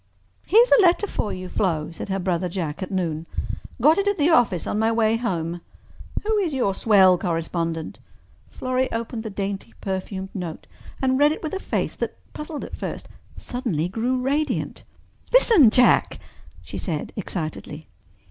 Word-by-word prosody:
"Here's 465 Hz, +5 st, +6 dB
a 465 Hz, -, +7 dB
letter 360 Hz, +2 st, +4 dB
for 215 Hz, -, -2 dB
you, 185 Hz, 0 st, -5 dB
Flo," 170 Hz, -5 st, -1 dB
said 170 Hz, -, -7 dB
her 195 Hz, -, 0 dB
brother 180 Hz, -1 st, -1 dB
Jack 165 Hz, -2 st, -4 dB
at 185 Hz, -, -4 dB
noon. 170 Hz, -4 st, -2 dB, 0.5 s
"Got 305 Hz, +9 st, +5 dB
it 400 Hz, -, 0 dB
at 405 Hz, -, +2 dB
the 310 Hz, +2 st, +3 dB
office 230 Hz, -, +3 dB
on 210 Hz, -, -1 dB
my 220 Hz, +1 st, +2 dB
way 225 Hz, -1 st, +2 dB
home. 175 Hz, -7 st, -2 dB, 0.6 s
Who 435 Hz, 0 st, +2 dB
is 340 Hz, -8 st, -1 dB
your 220 Hz, -7 st, +1 dB
swell 190 Hz, -4 st, +5 dB
correspondent?" 165 Hz, -2 st, -2 dB, 0.5 s
Florrie 255 Hz, 0 st, -1 dB
opened 230 Hz, 0 st, -3 dB
the 220 Hz, -, -5 dB
dainty, 195 Hz, -1 st, -4 dB
perfumed 190 Hz, 0 st, -4 dB
note 175 Hz, -5 st, -6 dB, 0.4 s
and 260 Hz, 0 st, +2 dB
read 295 Hz, +1 st, +5 dB
it -, -, -9 dB
with 310 Hz, -, -4 dB
a 390 Hz, -, -2 dB
face -, -, -2 dB
that, -, -, -3 dB, 0.2 s
puzzled 300 Hz, 0 st, -6 dB
at -, -, -8 dB
first, -, -, -6 dB, 0.3 s
suddenly 225 Hz, -, -2 dB
grew 240 Hz, +7 st, -1 dB
radiant. 285 Hz, +4 st, -1 dB, 0.5 s
"Listen, 450 Hz, -, +7 dB
Jack," 250 Hz, +2 st, +4 dB, 0.5 s
she -, -, -6 dB
said 155 Hz, -5 st, -3 dB
excitedly. 160 Hz, -5 st, -5 dB
205 Hz, 165 wpm, -23 LUFS, 180-265 Hz, 0.6 s, a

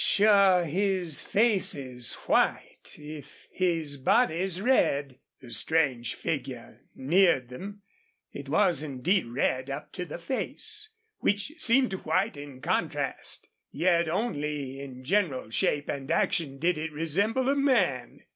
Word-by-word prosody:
"Sure 200 Hz, -4 st, +5 dB
his 180 Hz, -1 st, 0 dB
face 215 Hz, -2 st, +3 dB
is 125 Hz, -4 st, -4 dB
white, -, -, 0 dB
if 150 Hz, -1 st, -11 dB
his 165 Hz, -6 st, 0 dB
body's 180 Hz, -, +2 dB
red!" 145 Hz, -, +1 dB, 0.2 s
The 125 Hz, -2 st, -12 dB
strange 125 Hz, 0 st, 0 dB
figure -, -, -5 dB
neared 145 Hz, -3 st, +3 dB
them. 200 Hz, +10 st, -9 dB, 0.5 s
It 140 Hz, -1 st, -8 dB
was 160 Hz, 0 st, +2 dB
indeed 155 Hz, +4 st, 0 dB
red 130 Hz, +2 st, -1 dB
up 140 Hz, +2 st, -6 dB
to 180 Hz, -, -4 dB
the 160 Hz, -, -7 dB
face, 425 Hz, -, -5 dB, 0.3 s
which 205 Hz, +7 st, 0 dB
seemed 255 Hz, -2 st, +3 dB
white 195 Hz, +1 st, 0 dB
in 145 Hz, -2 st, -10 dB
contrast. -, -, -2 dB, 0.2 s
Yet 170 Hz, -2 st, +2 dB
only 150 Hz, -, -2 dB
in 130 Hz, -2 st, -9 dB
general 145 Hz, -, 0 dB
shape 145 Hz, +5 st, 0 dB
and 140 Hz, -1 st, -4 dB
action 140 Hz, -5 st, 0 dB
did 170 Hz, +2 st, +1 dB
it 160 Hz, 0 st, -4 dB
resemble 200 Hz, -, 0 dB
a 275 Hz, -, +3 dB
man. 200 Hz, -, +1 dB
160 Hz, 125 wpm, -28 LUFS, 140-200 Hz, 0.5 s, Sure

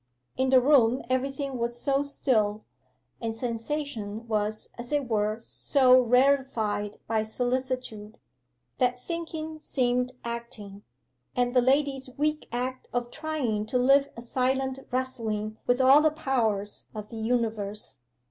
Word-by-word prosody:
In 260 Hz, 0 st, +1 dB
the 260 Hz, -1 st, +7 dB
room 255 Hz, -2 st, +4 dB
everything 270 Hz, 0 st, -1 dB
was 235 Hz, +1 st, -2 dB
so 275 Hz, +1 st, +1 dB
still, 220 Hz, -7 st, 0 dB, 0.6 s
and 225 Hz, -1 st, -2 dB
sensation 235 Hz, -2 st, -3 dB
was 215 Hz, -1 st, -1 dB
as 240 Hz, +2 st, -7 dB
it 290 Hz, -3 st, 0 dB
were 215 Hz, -1 st, 0 dB
so 255 Hz, +2 st, +4 dB
rarefied 240 Hz, -5 st, +2 dB
by 220 Hz, -1 st, +1 dB
solicitude, 245 Hz, -2 st, -3 dB, 0.6 s
that 250 Hz, 0 st, +1 dB
thinking 320 Hz, -2 st, -5 dB
seemed 250 Hz, -3 st, 0 dB
acting, 235 Hz, -4 st, -6 dB, 0.5 s
and 245 Hz, 0 st, +1 dB
the 250 Hz, -, +6 dB
lady's 270 Hz, 0 st, +1 dB
weak 300 Hz, +1 st, 0 dB
act 255 Hz, +2 st, -3 dB
of 245 Hz, 0 st, -2 dB
trying 275 Hz, -10 st, -2 dB
to 250 Hz, -, 0 dB
live 275 Hz, +3 st, +4 dB
a 235 Hz, -, -7 dB
silent 265 Hz, +2 st, 0 dB
wrestling 225 Hz, -4 st, -2 dB
with 245 Hz, +1 st, +3 dB
all 265 Hz, +3 st, +7 dB
the 310 Hz, -, +5 dB
powers 230 Hz, -9 st, -1 dB
of 210 Hz, -1 st, -6 dB
the 230 Hz, -, -8 dB
universe. 220 Hz, -, -2 dB
250 Hz, 130 wpm, -27 LUFS, 220-270 Hz, 0.6 s, the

